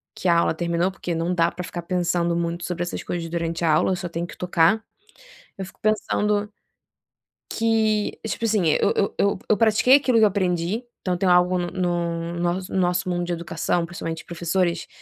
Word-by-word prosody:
que 185 - -3
a 170 - +5
aula 170 - +2
terminou, 170 +2 0
porque 180 -2 -5
não 165 +2 -1
dá 170 -1 +2
para 180 - -6
ficar 175 0 -6
pensando 175 -1 0
muito 170 0 -2
sobre 175 -1 -4
essas 175 - -5
coisas 170 -1 -4
durante 165 0 -3
a 165 - +3
aula, 155 +4 +3
eu - - +1
só 175 -1 -5
tenho 170 +1 -3
que - - -11
tocar. 180 +4 +2 0.7
Eu 195 - -5
fico 190 - -14
pensando 210 -1 0 1.0
que 220 -2 +1
tipo 230 - -2
assim 210 -5 +2
eu 155 - +3
eu 200 - 0
eu 200 -1 +2
eu 215 - +4
pratiquei 225 +3 +5
aquilo 260 -4 +1
que 220 - +5
eu - - +8
aprendi. 185 +2 -1 0.2
Então 180 -1 -1
tenho 180 0 +2
algo 180 +1 +4
no 175 0 -2 0.6
no 175 - -5
nosso 175 +2 -2
nosso 180 0 +1
mundo 175 0 -1
de 175 - -2
educação, 170 0 -1
principalmente 165 -1 -6
professores 170 +1 -1
180 Hz, 195 wpm, -23 LUFS, 170-200 Hz, 1.0 s, eu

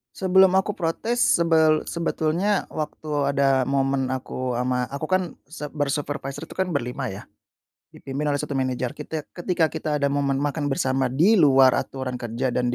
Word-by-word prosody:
Sebelum 190 0 +5
aku 200 +2 -1
protes, 220 +8 -1
sebel 160 -2 +3
sebetulnya 170 +4 0
waktu 150 -2 -3
ada 135 -1 +2
momen 135 0 0
aku 130 -1 -3
ama, 125 0 0
aku 140 +3 -4
kan 185 +2 +2 0.2
sep 150 -2 -7
ber 145 -1 -1
supervisor 140 0 -4
tuh - - -12
kan 190 - +2
berlima 130 0 -2
ya, 100 -4 -6 0.7
dipimpin 140 +2 -4
oleh 145 -1 0
satu - - -6
manajer. 130 -1 -1
Kitek 155 -2 -7
ketika 175 -2 0
kita 150 -2 -2
ada 140 - +2
momen 140 -1 0
makan 145 +1 -1
bersama 135 -1 0
di 165 - +3
luar 135 -5 +6
aturan 130 -2 -4
kerja 120 +2 -2
dan 125 0 0
140 Hz, 165 wpm, -24 LUFS, 130-160 Hz, 0.7 s, luar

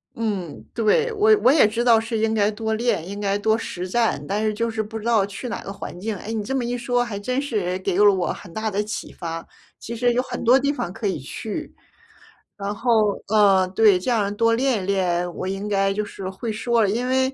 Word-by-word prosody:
嗯， 200 -8 -3
对。 450 - +2
我 430 0 +5
我 255 - +6
也 300 - +6
知 235 +3 -2
道 230 -2 +6
是 225 0 -3
应 220 0 +1
该 210 -1 +2
多 220 +1 -3
练， 220 -7 0
应 200 +1 -6
该 200 -1 0
多 220 +2 +2
实 185 -5 -5
战， 230 +4 0
但 205 +2 -1
是 215 -1 +1
就 230 +2 -1
是 220 -1 -2
不 220 +1 -7
知 215 - -10
道 225 -4 +3
去 200 +5 -7
哪 230 - -4
个 195 - -6
环 195 -2 -8
境。 215 +4 -3
哎， 215 +5 -6
你 220 -2 -2
这 235 - -4
么 260 -3 0
一 245 +1 -2
说， 245 0 0
还 230 -4 -5
真 250 +6 -1
是 200 -10 -2
给 190 -1 -1
了 205 -1 +6
我 185 -2 -1
很 180 - -12
大 220 0 -2
的 205 0 -1
启 210 0 -6
发， 165 -1 -6 0.3
其 235 - -6
实 245 +1 +2
有 245 - +1
很 245 -1 -6
多 250 +3 +6
地 285 +2 0
方 175 - -4
可 205 +3 -3
以 190 - -1
去， 220 - -6 0.8
然 200 0 -4
后 240 +3 -1 0.4
呃， 200 -3 +4
对 200 0 +5
这 245 +7 -2
样 205 -3 +1
多 230 +1 +3
练 235 -5 +1
练， 180 -3 0
我 185 - -4
应 195 +2 -3
该 195 -1 +1
就 210 +2 -2
是 195 -2 -7
会 205 +4 -5
说 230 +1 +1
了， 200 - +2
因 235 +5 -1
为 260 +1 +1
215 Hz, 260 characters per minute, -23 LUFS, 195-235 Hz, 0.8 s, 我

